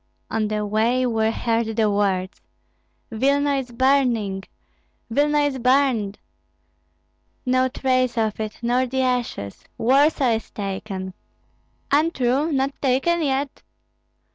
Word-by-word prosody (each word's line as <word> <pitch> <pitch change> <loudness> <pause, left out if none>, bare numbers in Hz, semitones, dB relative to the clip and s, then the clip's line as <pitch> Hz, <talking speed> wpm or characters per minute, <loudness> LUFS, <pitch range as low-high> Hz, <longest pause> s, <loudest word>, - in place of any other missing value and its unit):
On 220 -1 0
the 210 0 -2
way 225 +5 +1
were 220 -2 +1
heard 225 -1 -1
the 220 -1 +2
words: 195 -2 -1 0.7
"Vilna 280 +4 +1
is 260 -2 -4
burning, 235 -6 +1 0.7
Vilna 295 +4 +2
is 285 -2 0
burned! 250 -5 +2 1.3
No 255 0 +2
trace 255 -1 0
of 220 -2 0
it, 215 -1 -4
nor 250 +2 +1
the 260 +1 -1
ashes! 245 - -2
Warsaw 270 +2 +3
is 225 - -11
taken! 190 -1 -5 0.8
Untrue, 285 -1 +2
not 275 0 0
taken 280 +6 +1
yet! 275 -1 -1
250 Hz, 115 wpm, -22 LUFS, 220-270 Hz, 1.3 s, Warsaw